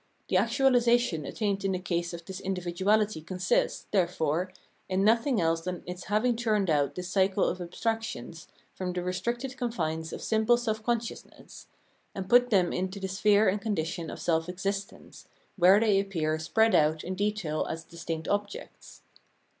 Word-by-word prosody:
The - - 0
actuahsation 240 - +3
attained 200 -3 -2
in 195 -1 0
the - - 0
case 175 -1 -2
of 170 -1 -8
this 190 +1 -7
individuahty 190 +1 0
consists, 185 +2 0
therefore, 175 -2 0 0.4
in 190 +1 +1
nothing 230 +3 +3
else 165 0 +1
than 180 0 -5
its 180 0 -7
having 220 +4 +1
turned 215 -6 +1
out 145 -2 +1
this 180 0 -5
cycle 190 +1 +2
of 185 - -1
abstractions 175 - -4 0.3
from 180 -1 -4
the 180 0 -3
restricted 235 +9 -3
confines 160 -11 -2
of - - -7
simple 220 +2 +3
self 220 -3 -2
consciousness, 235 0 -5 0.5
and 190 -1 -4
put 245 +3 +5
them 190 -6 +3
into 190 +2 -3
the 190 - -3
sphere 205 +2 +3
and 200 +2 +1
condition 170 -5 -2
of - - -7
self 165 0 0
existence, 195 +2 -5 0.3
where 190 +2 +6
they 210 -3 +3
appear 160 -6 -1
spread 220 +8 +2
out 155 0 +3
in 185 - -4
detail 195 -6 -1
as 165 0 -4
distinct 165 -1 -6
objects. 205 0 -5
190 Hz, 160 wpm, -28 LUFS, 170-215 Hz, 0.5 s, where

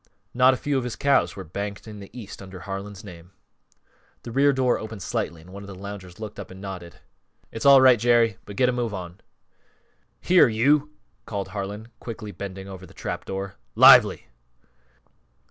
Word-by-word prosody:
Not 130 +1 +5
a - - -7
few 145 0 -1
of - - -4
his 125 -2 -4
cows 140 -1 +2
were 95 - -7
banked 100 +5 -6
in 105 -1 -9
the 100 - -11
East 115 -6 -10
under 95 -2 -10
Harlan's 100 0 -7
name. 90 -2 -12 0.9
The 120 - -7
rear 140 +4 +4
door 130 -2 +1
opened 110 -3 -7
slightly 85 0 -3
and 90 +3 -15
one 100 - -8
of 100 - -10
the 100 - -9
loungers 95 -2 -9
looked 105 -2 -7
up 100 - -8
and 95 - -11
nodded. 95 -4 -8 0.6
"It's 115 +4 -1
all 135 -1 +9
right 130 -3 +6
Jerry. 115 -3 +3
But 100 - -9
get 125 +4 +3
a - - +3
move 120 -4 -2
on!" 90 0 -8 1.0
"Here, 180 -4 +5
you!" 140 +7 +2 0.4
called 100 -3 -4
Harlan, 105 +3 -6
quickly 110 -3 -7
bending 95 +1 -7
over 95 -1 -10
the - - -18
trap - - -5
door, 95 0 -5 0.2
"_Lively! - - +8
100 Hz, 185 wpm, -24 LUFS, 95-120 Hz, 1.0 s, all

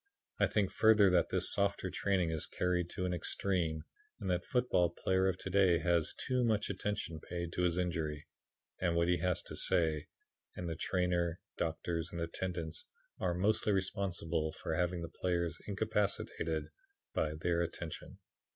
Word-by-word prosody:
I - - +5
think 100 -3 +1
further 110 -3 +6
that 90 -1 +3
this 90 -1 +1
softer 100 -2 0
training 95 -4 +1
is 80 -2 0
carried 90 -1 0
to 90 - -2
an 90 - 0
extreme, 85 -3 0 0.4
and 95 - -1
that 90 0 +1
the - - -22
football 125 -9 +3
player 95 +2 +1
of 95 -1 +1
to 95 - -5
day 95 -3 +5
has 85 0 +2
too 125 -1 +2
much 110 -3 +1
attention 100 -4 -3
paid 85 +1 -5
to - - -1
his 90 -1 +2
injury, 80 -4 -1 0.5
and 85 -2 +1
what 85 0 +3
he 90 0 +3
has 90 +1 0
to - - -7
say, 80 -3 +1 0.5
and 90 - -4
the 80 - -2
trainer, 90 -1 0 0.2
doctors 85 0 -2
and 85 - -5
attendants 85 -1 -3 0.4
are 90 -2 0
mostly 105 +3 +2
responsible 90 -5 -1
for - - -4
having 90 +1 0
the - - -3
players 85 -2 -1
incapacitated 100 -6 -1 0.4
by 75 0 0
their 85 +2 +1
attention. 85 -1 -5
90 Hz, 165 wpm, -34 LUFS, 85-95 Hz, 0.5 s, further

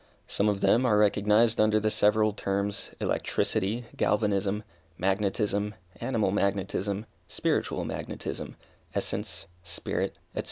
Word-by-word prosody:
Some 105 +1 +1
of 100 -1 -1
them 105 +6 +4
are 110 -5 +4
recognized 105 +2 +4
under 110 0 +4
the 110 0 +1
several 105 0 +3
terms, 100 0 -2
electricity, 110 +5 0
galvanism, 105 0 +1 0.3
magnetism, 100 +2 0 0.2
animal 115 -5 0
magnetism, 100 +1 0 0.2
spiritual - - 0
magnetism, - - -5 0.4
essence, - - -2 0.2
spirit, 85 0 -2 0.2
&c. - - -2
105 Hz, 110 wpm, -28 LUFS, 100-110 Hz, 0.4 s, them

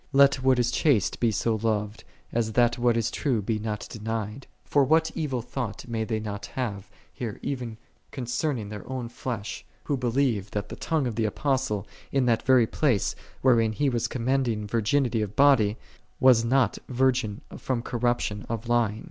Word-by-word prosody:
Let 140 -1 +5
what 130 -1 +4
is 120 -1 +2
chaste 135 - +2
be 120 - +3
so 110 +1 0
loved, 105 -1 -1 0.3
as 115 -2 -1
that 120 +1 +3
what 120 -1 +3
is 115 0 0
true 130 -6 0
be 105 +2 -1
not 105 -1 -4
denied. 110 +2 -4 0.2
For 145 - +3
what 160 +4 +3
evil 135 -7 -2
thought 125 -2 -5
may 115 -2 -2
they 110 -1 -1
not 105 -1 -5
have 105 -7 -3 0.3
even 120 0 -4 0.3
concerning 125 -2 -2
their 105 +3 -8
own 130 -3 -4
flesh, 115 -4 -5 0.2
who 145 - 0
believe 120 -5 0
that 105 0 -4
the - - -6
tongue 160 -4 -1
of 120 - -1
the 115 - +1
Apostle, 130 -3 0 0.3
in 135 -2 +2
that 115 -2 +2
very 130 -3 +5
place, 120 -4 +1 0.3
wherein 115 -4 +4
he 145 +5 +1
was 120 -3 0
commending 120 -3 0
vir 115 +2 0
ginity 115 -1 +1
of 105 0 -6
body, 125 -7 +5 0.4
was 125 -3 +6
not 125 -1 +2
virgin 125 -4 +1
from 125 -3 -2
corruption 120 -4 -1
of 115 0 -4
lying. 115 -3 +1
120 Hz, 175 wpm, -26 LUFS, 110-130 Hz, 0.4 s, was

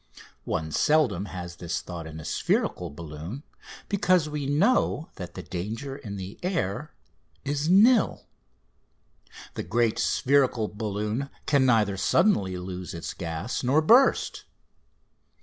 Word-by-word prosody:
One 80 0 -2
seldom 150 - +2
has 85 -2 -7
this 85 -1 -3
thought 85 -3 -7
in 80 0 -8
a 80 - -9
spherical 90 -1 0
balloon, 80 - -8 0.4
because 185 -5 +2
we 150 -2 -3
know 160 - +2
that 90 -2 -8
the 90 - -6
danger 110 +11 -5
in 105 -7 -7
the 95 +2 -8
air 170 - -2 0.5
is 145 +2 -1
nil: 215 +5 +5 1.3
the - - -4
great 115 -2 +1
spherical 130 -5 +2
balloon 105 +5 -3 0.2
can 140 -3 +3
neither 105 -5 +3
suddenly 95 - +2
lose 90 -1 -6
its 85 - -5
gas 85 +8 -4
nor 135 +5 +4
burst. 235 - +4
110 Hz, 125 wpm, -26 LUFS, 90-145 Hz, 1.3 s, nil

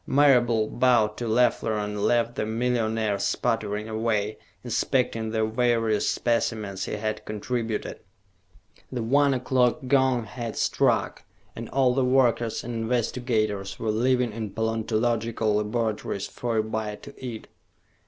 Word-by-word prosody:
Marable 120 -6 +4
bowed 120 -4 +2
to 120 - -3
Leffler 115 -1 +2
and 105 0 -3
left 120 +2 +2
the 130 - -2
millionaire 110 -3 0
sputtering 105 0 -1
away, 110 -1 -1 0.2
inspecting 115 -1 0
the 110 0 0
various 115 -2 +1
specimens 110 -5 -1
he - - -5
had 110 0 -3
contributed. 110 +1 -3 0.9
The 125 -3 -3
one 140 +3 +3
o'clock 125 +2 +1
gong 130 -3 +3
had 115 +1 -6
struck, - - +1 0.3
and - - -7
all 130 -2 +3
the 135 +1 +1
workers 125 -3 +2
and 120 - -5
investigators 115 -3 -1
were 110 - -1
leaving 125 +2 +1
in 110 -1 -4
paleontological 110 0 0
laboratories 105 -2 -2
for 120 -2 -3
a 110 - +2
bite 110 -1 -4
to 140 - -10
eat. 115 -4 -6
115 Hz, 130 wpm, -26 LUFS, 110-125 Hz, 0.9 s, Marable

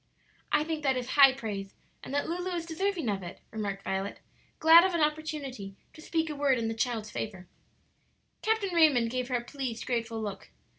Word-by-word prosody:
"I 300 - +3
think 315 -1 -3
that 270 -3 +1
is 250 0 -4
high 275 -1 +8
praise, 205 -6 -6 0.3
and - - -8
that 285 +1 0
Lulu 355 +2 -2
is 335 -1 -3
deserving 345 -2 -2
of 200 -2 -1
it," 175 -1 -8
remarked 200 -3 -4
Violet, 195 +1 -3 0.4
glad 325 +2 +8
of 375 -2 +1
an 335 - +1
opportunity 300 -9 -2 0.2
to 310 - -13
speak 325 0 -1
a 300 - -4
word 280 -2 +2
in 230 -1 -1
the - - -2
child's 225 -2 -2
favor. 190 -4 -5 0.9
Captain 435 -4 0
Raymond 285 -9 +4
gave 255 0 -2
her 255 - -1
a 240 - -1
pleased, 250 -3 -5
grateful 230 -2 -2
look. 205 -3 -6
265 Hz, 195 wpm, -29 LUFS, 220-315 Hz, 0.9 s, high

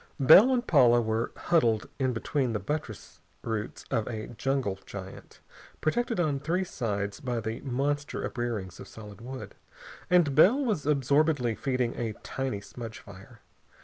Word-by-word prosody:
Bell 180 - +8
and 245 -1 +1
Paula 125 - +5
were 110 0 -1
huddled 115 -11 +2
in 130 -1 +1
between 125 +1 -1
the 105 - -1
buttress 120 - -5 0.2
roots 110 -2 -4
of 110 - 0
a 110 -2 -5
jungle 120 -4 -2
giant, 95 -1 -10 0.4
protected 230 +7 0
on 150 -5 +1
three 170 +7 0
sides 105 - -3
by 125 -5 -2
the 110 +1 -4
monster 145 +2 -2
uprearings 110 -7 -4
of - - -9
solid 105 -1 -11
wood, 130 +2 -8 0.6
and 175 -6 +4
Bell 185 - +6
was 200 - -1
absorbedly 140 -3 +2
feeding 125 0 -1
a 115 -2 -2
tiny 130 -7 -3
smudge 115 +1 -8
fire. 100 +4 -14
125 Hz, 145 wpm, -28 LUFS, 110-145 Hz, 0.6 s, Bell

